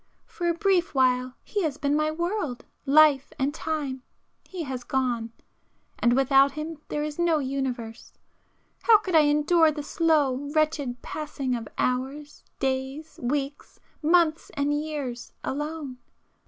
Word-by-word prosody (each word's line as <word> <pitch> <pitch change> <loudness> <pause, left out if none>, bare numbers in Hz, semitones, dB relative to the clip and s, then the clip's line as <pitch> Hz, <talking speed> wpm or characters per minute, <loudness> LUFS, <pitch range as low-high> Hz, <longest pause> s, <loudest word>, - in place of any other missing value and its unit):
For 345 -1 -3
a 340 - +1
brief 360 -4 +1
while 255 -1 +2
he 415 - -2
has 305 -5 -1
been 285 0 +1
my 305 0 +2
world, 340 - -3 0.2
life 290 -1 +5
and 280 +1 0
time,—he 310 +3 -6
has 260 -4 -5
gone,—and 240 -1 -3
without 270 +1 +4
him 305 0 -6
there 295 - -2
is 300 +1 -5
no 340 -2 +3
universe. 260 -5 -4 0.7
How 455 -2 +7
could 390 -3 -5
I 315 -2 +6
endure 310 +3 +4
the 295 -1 -5
slow, 285 -4 +1
wretched 295 -6 0
passing 285 -4 -3
of 230 -2 -5
hours, 270 +4 -2
days, 270 +4 -3
weeks, 275 +3 -3 0.2
months 325 0 +3
and 285 +1 +1
years 295 -5 -4
alone? 295 -2 -4
290 Hz, 130 wpm, -26 LUFS, 265-315 Hz, 0.7 s, How